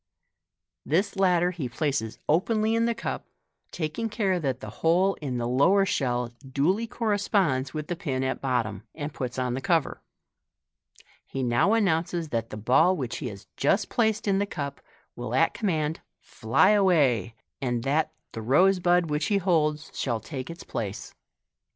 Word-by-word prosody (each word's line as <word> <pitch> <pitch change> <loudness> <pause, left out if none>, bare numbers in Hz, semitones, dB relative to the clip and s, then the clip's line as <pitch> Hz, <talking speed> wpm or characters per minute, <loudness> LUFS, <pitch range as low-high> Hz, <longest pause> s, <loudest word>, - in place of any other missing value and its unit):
This 185 +9 0
latter 180 -2 +3
he 155 -8 -4
places 135 -4 -2
openly 215 +7 +2
in 230 0 +2
the 235 0 0
cup, - - -4 0.4
taking 170 +8 -3
care 200 -4 0
that 135 -5 -2
the - - -8
hole 180 +4 +3
in 130 -4 -3
the 120 0 -1
lower 185 +11 +4
shell 125 -7 -1
duly 150 - 0
corresponds 200 - 0
with 155 -1 -3
the 175 - -3
pin 135 -7 -2
at 130 0 -2
bottom, 115 -7 -1
and 145 -1 -5
puts 125 -1 -4
on 125 -1 -1
the 130 - -3
cover. 165 -1 0 1.2
He 135 - -4
now 120 - +3
announces 170 -5 +1
that 115 -3 -2
the 105 - -7
ball 160 - +3
which 130 -5 -3
he 140 - -4
has 100 -4 -9
just 195 +9 +2
placed 220 -3 +1
in 195 -1 +3
the 205 - 0
cup 140 -6 -5 0.3
will 120 0 -4
at 165 +5 +3
commaud 160 -7 -1 0.2
fly 115 - +2
away, 145 - +3 0.3
and 120 -3 -1
that 150 +4 +1 0.2
the 115 - -6
rose 180 - +4
bud 175 -2 +2
which 150 +1 0
he 205 - +2
holds 155 -5 +1
shall 120 -4 -1
take 130 +4 -7
its 170 +1 -8
place. 100 -3 -5
155 Hz, 165 wpm, -26 LUFS, 130-190 Hz, 1.2 s, lower